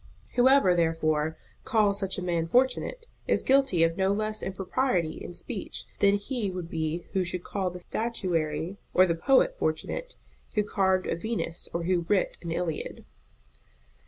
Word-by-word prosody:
Whoever, 250 -6 +5
therefore, 160 -2 +1 0.3
calls 210 -4 +2
such 195 -2 -2
a 185 - -3
man 170 -2 0
fortunate, 260 - +1 0.2
is - - +2
guilty 265 -11 +4
of 165 0 +1
no 190 0 +2
less 215 +1 0
impropriety 190 -2 -1
in 175 - -8
speech 215 0 -4
than 200 0 +5
he 205 +1 -2
would 180 -2 -6
be 160 +2 -2
who 190 - +2
should 180 0 -3
call 190 -2 -2
the 180 0 -9
statuary 175 -6 -2 0.2
or 185 - +7
the 170 - +1
poet 270 - +3
fortunate - - -2 0.4
who 210 - +3
carved 190 -2 +1
a - - -1
Venus 175 -3 -3
or 170 - -2
who 175 -1 0
writ 200 -3 +1
an 170 - -5
Iliad. 165 -2 -3
185 Hz, 160 wpm, -28 LUFS, 170-215 Hz, 0.4 s, or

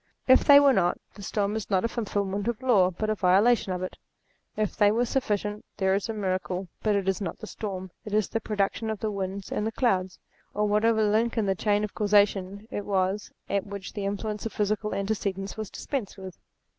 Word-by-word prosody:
If 260 0 +7
they 285 -1 +9
were 280 -1 +5
not, 175 -5 +2 0.2
the 205 - -12
storm 205 +1 -1
is 220 - -4
not 190 +1 +2
a - - +3
fulfilment 205 -3 -2
of 235 +1 -2
law, 205 -8 +4
but 215 +4 -2
a - - +3
violation 200 +2 +3
of 180 0 -2
it. 185 - -5 0.6
If 215 -2 -1
they 205 -1 +4
were 235 +3 +2
sufficient, 210 -4 -1
there 190 -2 +2
is 200 +3 -1
a - - -1
miracle, 185 -2 -2
but 215 -2 +2
it 195 -1 -1
is 195 +1 0
not 190 - -4
the 215 - -8
storm; 190 -4 -6
it 215 - -8
is 210 -3 +2
the 225 - -2
production 210 +1 -1
of 220 -2 -3
the 215 0 -2
winds 195 -1 -4
and 215 +1 -1
clouds, 190 -7 +1 0.4
or 210 +1 +1
whatever 220 +1 +3
link 220 +3 +1
in 220 - +2
the 195 - +2
chain 205 +2 +1
of 210 - -4
causation 205 -1 +2
it 205 - -3
was 195 +1 -1 0.2
at 200 0 -1
which 200 -1 -7
the 205 -2 -4
influence 210 +1 -3
of - - -10
physical 210 0 -1
antecedents 195 -1 -2
was 215 -2 -5
dispensed 250 -10 -4
with. 190 -2 -9
205 Hz, 215 wpm, -27 LUFS, 195-215 Hz, 0.6 s, they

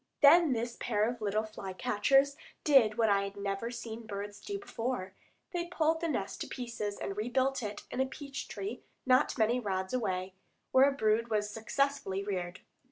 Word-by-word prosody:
Then 315 0 +8
this 235 0 -3
pair 215 -2 +1
of 240 -1 -4
little 215 +1 +1
fly 205 -3 -7
catchers 270 +6 +3 0.3
did 250 -8 +5
what 225 - +4
I 200 -1 +4
had 200 0 -6
never 200 +3 -2
seen 230 -1 -7
birds 205 0 -5
do 405 - -4
before; 235 - -4 0.4
they 345 -1 -2
pulled 325 -1 +1
the 335 - 0
nest 225 -10 -3
to - - -3
pieces 235 -5 -4
and 195 - -4
rebuilt 255 +5 0
it 210 -2 -5
in 260 - 0
a 265 - +1
peach 280 0 -7
tree 395 +2 -5 0.2
not 255 +2 +3
many 235 +2 +3
rods 190 -3 -2
away, 190 -6 -1 0.4
where 265 +2 +7
a - - -1
brood 225 -3 +2
was 210 -2 0
successfully 225 -3 -1
reared. 185 -3 -4
230 Hz, 180 wpm, -32 LUFS, 205-270 Hz, 0.4 s, Then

